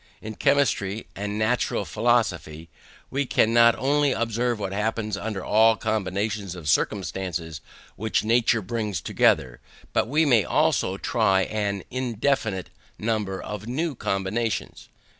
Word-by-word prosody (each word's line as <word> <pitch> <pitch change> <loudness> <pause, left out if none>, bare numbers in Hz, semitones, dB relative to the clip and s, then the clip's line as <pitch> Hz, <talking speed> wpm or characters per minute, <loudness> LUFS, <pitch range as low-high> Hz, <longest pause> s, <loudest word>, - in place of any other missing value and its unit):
In 110 - -7
chemistry 115 -6 +1
and 105 +1 -4
natural 110 +3 0
philosophy, 80 +2 0 0.4
we 140 0 -1
can 115 -1 +2
not 115 0 +6
only 145 +1 +2
observe 115 +1 -1
what 100 -2 -4
happens 110 0 -1
under 100 -1 -4
all 110 +1 +5
the - - -21
combinations 105 -2 -2
of 85 -4 -8
circumstances 85 -2 -1 0.4
which 110 +1 0
nature 115 0 +2
brings 105 -3 -2
together, 65 -4 +1 0.3
but - - +2
we 155 +6 +2
may 120 -7 +4
also - - +1
try 95 0 +2
an 100 -1 -2
indefinite 120 -5 -1 0.3
number 105 -3 -2
of 105 +2 -6
new 155 +6 -1
combinations. 105 +1 -3
110 Hz, 130 wpm, -25 LUFS, 95-115 Hz, 0.4 s, not